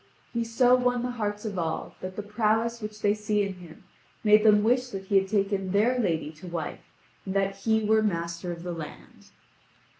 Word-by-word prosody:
He 235 Hz, -1 st, 0 dB
so 245 Hz, +2 st, +3 dB
won 250 Hz, -1 st, +2 dB
the 250 Hz, -, -2 dB
hearts 210 Hz, -3 st, -3 dB
of 200 Hz, -4 st, -3 dB
all 160 Hz, -1 st, -3 dB
that 185 Hz, 0 st, -6 dB
the 210 Hz, -, -4 dB
prowess 220 Hz, +2 st, 0 dB
which 210 Hz, 0 st, -7 dB
they 205 Hz, -, +4 dB
see 210 Hz, -1 st, 0 dB
in 195 Hz, -1 st, -3 dB
him 175 Hz, -3 st, -14 dB, 0.4 s
made 210 Hz, 0 st, +6 dB
them 210 Hz, -1 st, +6 dB
wish 250 Hz, +3 st, +2 dB
that 195 Hz, -6 st, -6 dB
he 195 Hz, +1 st, +2 dB
had 195 Hz, -, -3 dB
taken 195 Hz, -1 st, 0 dB
their 235 Hz, +5 st, +3 dB
lady 165 Hz, -8 st, 0 dB
to 185 Hz, -, -8 dB
wife, 170 Hz, -3 st, -4 dB, 0.4 s
and 190 Hz, 0 st, -5 dB
that 195 Hz, 0 st, +1 dB
he 220 Hz, +2 st, +1 dB
were 220 Hz, +1 st, +4 dB
master 170 Hz, -3 st, -2 dB
of 170 Hz, 0 st, -7 dB
the 175 Hz, -1 st, -4 dB
land. 160 Hz, -3 st, -10 dB
210 Hz, 205 wpm, -27 LUFS, 185-220 Hz, 0.4 s, made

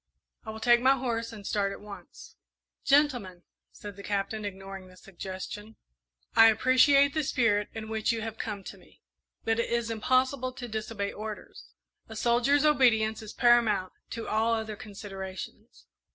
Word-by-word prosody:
I -, -, -7 dB
will 220 Hz, 0 st, -6 dB
take 240 Hz, +1 st, +4 dB
my 265 Hz, +2 st, +4 dB
horse 230 Hz, -2 st, -2 dB
and 210 Hz, -3 st, -10 dB
start 200 Hz, -1 st, 0 dB
at -, -, -7 dB
once." 205 Hz, -1 st, -12 dB, 0.5 s
"Gentlemen," 245 Hz, -12 st, +2 dB, 0.3 s
said 205 Hz, -1 st, -10 dB
the -, -, -8 dB
Captain, 205 Hz, +1 st, -2 dB
ignoring 195 Hz, -1 st, -7 dB
the 185 Hz, 0 st, -17 dB
suggestion, 195 Hz, +3 st, -8 dB, 0.6 s
"I 225 Hz, -, +9 dB
appreciate 260 Hz, +5 st, +5 dB
the 310 Hz, -1 st, 0 dB
spirit 220 Hz, -6 st, +1 dB
in 220 Hz, -1 st, -6 dB
which 220 Hz, 0 st, 0 dB
you 225 Hz, -1 st, -3 dB
have 225 Hz, 0 st, -6 dB
come 205 Hz, -3 st, -4 dB
to -, -, -10 dB
me, -, -, -23 dB, 0.4 s
but 225 Hz, 0 st, +1 dB
it 235 Hz, -, 0 dB
is 235 Hz, -1 st, -1 dB
impossible 255 Hz, +3 st, +1 dB
to 250 Hz, -1 st, -7 dB
disobey 215 Hz, -2 st, -4 dB
orders. 215 Hz, 0 st, -8 dB, 0.4 s
A 220 Hz, -, -8 dB
soldier's 245 Hz, +6 st, +2 dB
obedience 225 Hz, -7 st, +3 dB
is 215 Hz, -1 st, -8 dB
paramount 230 Hz, -6 st, +3 dB, 0.2 s
to 230 Hz, -1 st, -6 dB
all 225 Hz, +2 st, +2 dB
other 220 Hz, -1 st, -4 dB
considerations. 195 Hz, +1 st, -9 dB
220 Hz, 160 wpm, -28 LUFS, 205-240 Hz, 0.6 s, I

